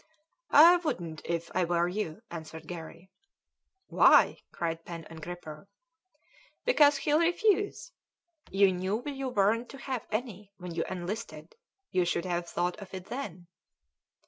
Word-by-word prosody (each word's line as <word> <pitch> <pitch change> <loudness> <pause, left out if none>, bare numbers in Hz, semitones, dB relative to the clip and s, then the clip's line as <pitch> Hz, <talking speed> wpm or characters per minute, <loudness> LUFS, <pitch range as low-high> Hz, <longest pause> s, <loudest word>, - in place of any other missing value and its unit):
"I 335 +5 +8
wouldn't 170 - -4
if 170 0 -3
I 185 - +2
were 175 0 +1
you," 195 +1 -4
answered 160 -1 -8
Garry. 170 +2 -9 0.7
"Why?" - - +5
cried 165 -1 -3
Pen 165 -2 -8
and 160 -1 -10
Gripper. 160 -1 -8 1.0
"Because 295 - +5
he'll 295 +2 +2
refuse. 410 +7 +1 0.6
You 195 -1 +4
knew 190 +6 -2
you 275 -2 -3
weren't 225 +2 +1
to 275 - -10
have 260 -4 -5
any 210 -3 -4
when 180 -2 -7
you 165 - -1
enlisted; 180 -3 -6 0.4
you 185 -2 +2
should 175 +1 -1
have 175 -1 -2
thought 175 0 -1
of 195 - -10
it 185 -1 -7
then." 200 -10 -6
185 Hz, 140 wpm, -29 LUFS, 170-250 Hz, 1.0 s, I